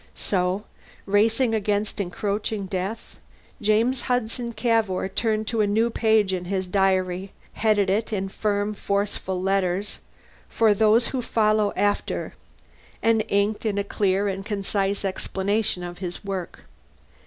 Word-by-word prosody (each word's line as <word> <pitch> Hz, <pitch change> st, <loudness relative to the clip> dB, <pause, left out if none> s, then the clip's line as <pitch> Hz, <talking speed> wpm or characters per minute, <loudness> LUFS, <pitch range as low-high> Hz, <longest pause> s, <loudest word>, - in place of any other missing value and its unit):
So, 185 Hz, +1 st, 0 dB, 0.4 s
racing 225 Hz, +4 st, +3 dB
against 210 Hz, -1 st, 0 dB
encroaching 200 Hz, +2 st, -2 dB
death, 190 Hz, +3 st, -4 dB, 0.4 s
James 225 Hz, +5 st, +2 dB
Hudson 240 Hz, 0 st, -1 dB
Cavour 220 Hz, -5 st, +1 dB
turned 215 Hz, +2 st, 0 dB
to 230 Hz, -2 st, +1 dB
a 210 Hz, -, +3 dB
new 225 Hz, +3 st, +2 dB
page 220 Hz, -4 st, +3 dB
in 180 Hz, -1 st, -2 dB
his 190 Hz, 0 st, -2 dB
diary, 190 Hz, 0 st, +1 dB, 0.2 s
headed 210 Hz, -2 st, +2 dB
it, 210 Hz, +5 st, 0 dB
in 195 Hz, -2 st, -1 dB
firm, 205 Hz, +1 st, -1 dB
forceful 200 Hz, -2 st, -2 dB
letters, 195 Hz, +1 st, 0 dB, 0.5 s
For 220 Hz, -2 st, +4 dB
Those 220 Hz, +3 st, +4 dB
Who 260 Hz, -, -2 dB
Follow 215 Hz, -3 st, +2 dB
After, 205 Hz, 0 st, -1 dB, 0.7 s
and 225 Hz, -1 st, +3 dB
inked 200 Hz, +1 st, +1 dB
in 210 Hz, -3 st, -1 dB
a 200 Hz, -, +1 dB
clear 200 Hz, 0 st, +1 dB
and 195 Hz, 0 st, -3 dB
concise 200 Hz, -1 st, -1 dB
explanation 195 Hz, 0 st, -1 dB
of 175 Hz, 0 st, -7 dB
his 180 Hz, 0 st, -6 dB
work. 190 Hz, -3 st, -5 dB
205 Hz, 130 wpm, -24 LUFS, 195-220 Hz, 0.7 s, For